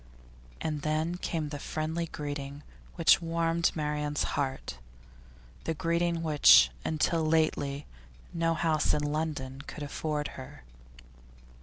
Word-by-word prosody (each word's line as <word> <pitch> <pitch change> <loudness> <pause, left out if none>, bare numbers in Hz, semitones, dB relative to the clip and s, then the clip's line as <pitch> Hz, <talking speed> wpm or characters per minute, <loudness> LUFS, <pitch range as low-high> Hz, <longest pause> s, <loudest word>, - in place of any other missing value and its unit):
And 150 -2 -2
then 155 +3 -1
came 160 -4 -3
the 145 -1 -5
friendly 160 +3 -3
greeting 145 -1 -6 0.3
which 165 -1 +5
warmed 165 0 +1
Marian's 150 -1 -1
heart, 135 - -3 0.9
the 160 - -1
greeting 170 +1 0
which 65 - +7
until 160 +1 +1
lately 155 -3 +1 0.5
no 165 -1 +1
house 160 -3 +2
in 150 - -1
London 145 -3 -3
could 150 - -7
afford 150 0 -3
her. 130 - -10
155 Hz, 115 wpm, -29 LUFS, 145-165 Hz, 0.9 s, which